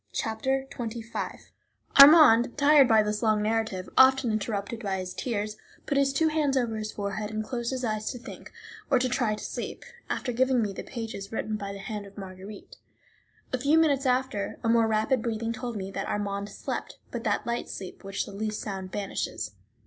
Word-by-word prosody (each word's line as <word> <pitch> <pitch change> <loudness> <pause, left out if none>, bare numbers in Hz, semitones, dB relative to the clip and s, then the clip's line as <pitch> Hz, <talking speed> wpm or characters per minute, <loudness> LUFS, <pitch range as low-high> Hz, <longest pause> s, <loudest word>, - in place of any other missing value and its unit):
Chapter 265 +5 -1
XXV 230 -1 -6 0.5
Armand, 275 -6 +8
tired 285 -2 +6
by 220 -2 +5
this 210 0 -2
long 215 -2 +2
narrative, 220 -4 -1
often 260 -2 +6
interrupted 215 +1 -2
by 195 -3 -1
his 185 -1 -5
tears, 215 -3 -3 0.3
put 285 - -1
his 275 0 +3
two 315 +4 +2
hands 300 -3 +1
over 235 -3 0
his 215 0 -4
forehead 205 +1 -4
and 215 0 -3
closed 240 0 -3
his 260 -1 -3
eyes 215 -1 -2
to 250 - -7
think, 245 - -10 0.4
or 270 - +5
to 255 +1 +1
try 240 -4 0
to - - -9
sleep, - - -6 0.2
after 255 - -2
giving 255 +1 +2
me 210 -3 -1
the - - -6
pages 225 -4 -6
written 220 -1 -2
by 200 -1 -5
the 200 - -7
hand 205 +1 -6
of 200 - -17
Marguerite. 195 +1 -10 0.8
A 255 - +1
few 285 +5 +3
minutes 285 -4 +3
after, 250 -5 0
a 225 - +1
more 230 -1 +4
rapid 220 +3 +1
breathing 230 0 -2
told 240 -1 -5
me 195 0 -5
that - - -4
Armand 200 0 -2
slept, - - -5
but - - -4
that - - 0
light 235 0 -2
sleep 185 - -8
which 195 0 -3
the - - -10
least 215 +1 -3
sound 190 -3 -5
banishes. 190 - -3
220 Hz, 195 wpm, -27 LUFS, 205-255 Hz, 0.8 s, Armand